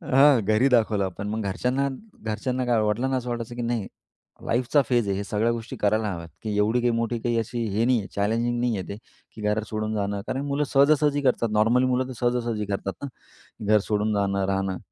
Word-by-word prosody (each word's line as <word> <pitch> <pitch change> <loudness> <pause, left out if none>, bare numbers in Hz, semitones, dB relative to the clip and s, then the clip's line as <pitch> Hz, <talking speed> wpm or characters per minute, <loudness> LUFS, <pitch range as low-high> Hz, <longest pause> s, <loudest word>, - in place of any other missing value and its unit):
हां, 140 -3 +7
घरी 110 +5 +3
दाखवलं 110 -5 +3
आपण 95 +2 -5
मग 110 +1 -2
घरच्यांना 130 +7 0 0.3
घरच्यांना 125 +4 -2
काय? 120 -2 +2
वडिलांना 120 +5 0
असं 125 -1 -4
वाटायचं 120 0 -4
की 120 - -4
नाही, 115 -4 -1 0.6
लाईफचा 125 +5 +2
फेज 120 -4 +2
आहे 100 - 0
हे, 100 - -2
सगळ्या 110 +3 0
गोष्टी 115 0 -5
करायला 105 0 +1
हव्यात 85 -2 -7
की 105 -1 -2
एवढी 110 +4 +2
काही 120 - +2
मोठी 115 0 -1
काही 120 0 0
अशी 115 +1 -3
हे 115 +2 +2
नाही 125 -1 +3
आहे. 100 - -6
चॅलेंजिंग 115 +4 0
नाही 120 -4 0
आहे 95 - -5
ते, 100 - -6 0.4
की 110 - -9
घरात 105 +1 0
सोडून 110 0 -2
जाणं. 100 -1 -2
कारण 135 - -2
मुलं 140 +1 0
सहजा-सहजी 145 +1 +3
करतात. 120 -4 +1
नॉर्मली 115 +4 +3
मुलं 130 0 +1
तर 130 - -6
सहजा-सहजी 120 -3 0
करतात 100 -1 -3
ना, 140 - -2 0.6
घर 105 0 +5
सोडून 105 0 +1
जाणं, 100 -1 0
राहणं. 95 -1 -1
115 Hz, 210 wpm, -25 LUFS, 105-125 Hz, 0.6 s, हां